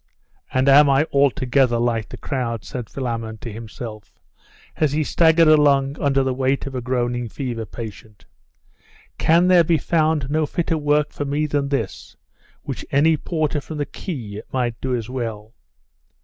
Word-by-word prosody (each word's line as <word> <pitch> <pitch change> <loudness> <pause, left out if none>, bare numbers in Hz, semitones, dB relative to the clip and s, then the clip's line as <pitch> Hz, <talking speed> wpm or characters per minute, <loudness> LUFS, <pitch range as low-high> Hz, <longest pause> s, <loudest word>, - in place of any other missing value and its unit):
'And 130 +1 +1
am 140 +1 +7
I 135 +1 +4
altogether 135 -3 +2
like 115 -2 -1
the - - -8
crowd?' 120 -6 -3
said 125 -4 -6
Philammon 115 -4 -4
to 115 0 -8
himself, 110 -1 -9 0.6
as 150 -3 +1
he 155 +1 +1
staggered 165 +1 +4
along 145 -2 +4
under 135 -1 +2
the 130 -1 0
weight 135 +1 0
of 135 - -6
a 130 - -3
groaning 120 -1 -1
fever 115 -3 -4
patient. 110 -2 -10 0.9
'Can 170 +2 +4
there 180 -2 +6
be 165 0 +2
found 155 -4 +1
no 155 0 +1
fitter 165 -2 -1
work 150 0 +1
for - - -3
me 145 +2 0
than 145 -2 -1
this, 115 -9 -4 0.5
which - - -5
any 155 +4 +4
porter 155 -2 -2
from 155 +3 -8
the 145 - -1
quay 115 - -6
might 120 -3 -2
do 130 -1 -1
as 115 -3 -4
well? 115 -4 -5
135 Hz, 165 wpm, -21 LUFS, 120-150 Hz, 0.9 s, am